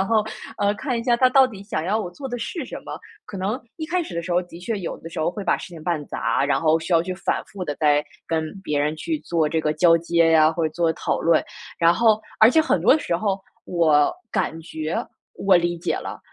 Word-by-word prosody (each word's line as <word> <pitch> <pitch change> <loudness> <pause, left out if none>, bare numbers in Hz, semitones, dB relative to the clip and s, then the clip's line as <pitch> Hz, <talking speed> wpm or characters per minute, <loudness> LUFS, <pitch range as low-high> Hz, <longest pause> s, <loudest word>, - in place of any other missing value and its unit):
然 190 - +1
后， 220 -2 +3 0.3
呃， 205 0 +2
看 245 +1 -2
一 - - -3
下 245 - +3
他 255 +2 +4
到 265 +1 +6
底 200 -5 -10
想 160 -6 -3
要 210 +4 +1
我 180 -4 -5
做 270 +10 -8
的 245 -2 -4
是 270 +6 -4
什 - - -7
么。 - - -6 0.3
可 200 - -8
能 205 +7 -2 0.2
一 315 - -4
开 355 +2 0
始 250 - -8
的 170 - -2
时 175 - -4
候， 175 - +3
的 170 -1 -12
确 210 +4 -3
有 180 - -5
的 165 - -9
时 160 - -5
候 160 - +1
会 195 +2 -6
把 - - +2
事 - - -8
情 165 -3 -11
办 170 -4 -1
砸， - - -1
然 145 - +2
后 160 0 +2
需 165 - -7
要 165 - +4
去 185 +1 -4
反 185 - -2
复 195 -2 -9
地 145 -4 -3
再 150 -1 +3 0.2
跟 160 -1 -1
别 150 -5 -1
人 150 +2 0
去 315 - -2
做 165 -3 0
这 160 +1 0
个 155 0 0
交 170 -2 +5
接 170 0 +2
呀， 155 -1 +6
或 165 0 -1
者 155 - -5
做 170 -1 +1
讨 - - -2
论。 165 -1 +3 0.3
然 170 0 +5
后 220 +2 +4 0.2
而 220 - +8
且 315 +4 +4
很 - - +1
多 305 - +5
时 175 - -2
候 195 +2 0 0.3
我 155 -4 +3 0.2
感 160 - -1
觉 155 0 -4 0.4
我 195 -2 +4
理 175 0 0
解 170 - -1
了， - - -6
175 Hz, 280 characters per minute, -23 LUFS, 160-215 Hz, 0.4 s, 而